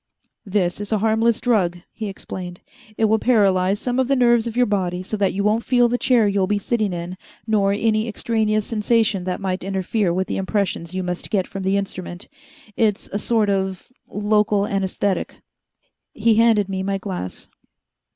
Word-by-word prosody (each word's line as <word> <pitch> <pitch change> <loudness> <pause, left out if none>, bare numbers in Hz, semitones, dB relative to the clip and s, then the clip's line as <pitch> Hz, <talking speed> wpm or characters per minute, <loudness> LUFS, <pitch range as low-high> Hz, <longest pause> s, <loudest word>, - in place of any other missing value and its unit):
"This 190 -1 0
is 205 - -6
a 215 - +3
harmless 225 +2 +2
drug," 195 -8 +1
he 215 -2 -5
explained. 180 -2 -7 0.4
"It 220 - +3
will 220 +1 +3
paralyze 200 -5 +3
some 250 +1 -1
of 260 - +2
the 275 - +2
nerves 240 -2 +3
of 235 +1 -5
your 250 - +5
body 185 -4 -1
so 205 - -4
that 200 -2 +2
you 200 - -2
won't 215 +3 +2
feel 245 -2 +3
the 245 +1 -1
chair 240 -5 +3
you'll 195 -2 +1
be 205 +1 +1
sitting 215 0 -1
in 175 +1 -5 0.3
nor 205 -3 +2
any 215 +2 +1
extraneous 215 -1 0
sensation 215 -3 +1
that 185 -1 -2
might 185 -2 -3
interfere 195 0 0
with 185 +2 0
the - - -3
impressions 190 -3 -2
you 185 - -1
must 180 0 -4
get 195 -4 +1
from 195 - -7
the 190 +1 +1
instrument. 185 -2 -5 0.5
It's 215 -3 0
a 205 - 0
sort 215 -2 +1
of 190 +2 -2 0.2
local 210 0 +1
anesthetic." 195 -1 -1 0.8
He 225 +1 +2
handed 220 -2 +4
me 190 -1 -3
my 195 +1 -1
glass. 185 - -6
205 Hz, 180 wpm, -21 LUFS, 190-220 Hz, 0.8 s, your